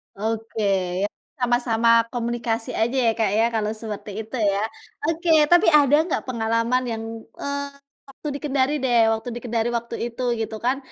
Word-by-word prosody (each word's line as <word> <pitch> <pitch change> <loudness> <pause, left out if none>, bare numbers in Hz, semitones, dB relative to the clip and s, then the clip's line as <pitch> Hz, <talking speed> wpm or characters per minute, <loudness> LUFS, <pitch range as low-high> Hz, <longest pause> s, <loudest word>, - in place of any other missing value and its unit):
Oke 220 +1 -3 0.4
ya - - +2 0.3
sama-sama 240 -2 +2 0.2
komunikasi 235 -1 -2
aja 240 +4 +1
ya 225 - +5
Kak 220 -3 +3
ya 225 - +4
kalau 215 -1 0
seperti 215 -1 -6
itu 225 +4 -8 0.2
ya. 200 - -1 0.5
Oke 330 +2 -1 0.2
tapi 350 - +6
ada 295 -2 +5
nggak 335 - -2
pengalaman 230 +1 0
yang, 225 0 -4 0.4
eee, 280 0 -2 0.4
waktu 275 +3 -9
di - - -4
Kendari 280 0 +1
deh 245 -2 +3 0.2
waktu 225 +3 -4
di - - -4
Kendari 235 -1 0
waktu 235 0 -6
itu 240 +2 -8 0.2
gitu 220 0 -3
kan, 260 +2 +2
235 Hz, 165 wpm, -23 LUFS, 225-265 Hz, 0.5 s, tapi